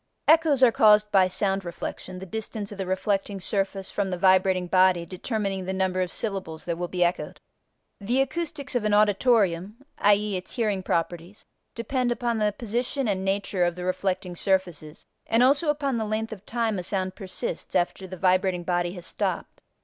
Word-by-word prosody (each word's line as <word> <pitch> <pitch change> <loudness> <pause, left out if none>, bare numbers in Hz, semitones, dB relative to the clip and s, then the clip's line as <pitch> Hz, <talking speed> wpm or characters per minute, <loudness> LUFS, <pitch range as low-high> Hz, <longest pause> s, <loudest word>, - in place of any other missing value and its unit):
Echoes 310 -4 +5
are 245 - +7
caused 210 -1 +5
by 190 -2 +5
sound 195 +1 0
reflection, 180 +1 -6
the 190 - -7
distance 215 +1 -5
of 200 - -9
the 190 - -3
reflecting 195 +1 -1
surface 195 0 -2
from 200 -2 -1
the 180 - -2
vibrating 185 0 +3
body 185 -1 +3
determining 195 +1 -3
the 190 - -2
number 185 -1 0
of 180 -2 -2
syllables 190 -7 -4
that 170 -1 -3
will 175 - -2
be 180 0 0
echoed. 175 +1 -2 0.6
The 235 +6 0
acoustics 285 0 -2
of 245 -3 0
an 210 -1 +2
auditorium 205 -3 +2 0.2
(i.e., 205 0 +3
its 185 - -6
hearing 210 -6 0
properties) 175 +2 -3 0.3
depend 245 +1 -1
upon 240 -2 -1
the 210 -1 +2
position 240 +5 -2
and 190 -2 -1
nature 195 -1 0
of 175 -1 +1
the 180 - -6
reflecting 185 0 -2
surfaces 175 -5 -2 0.2
and 230 +2 +3
also 280 +4 +3
upon 280 -4 0
the 220 - -1
length 220 +1 -2
of 205 -1 -13
time 225 -4 -1
a - - -4
sound 185 0 -2
persists 185 -4 -5
after 185 +2 0
the 185 0 -8
vibrating 185 0 +2
body 175 0 -1
has 180 -2 -8
stopped. - - -3
195 Hz, 180 wpm, -25 LUFS, 185-220 Hz, 0.6 s, are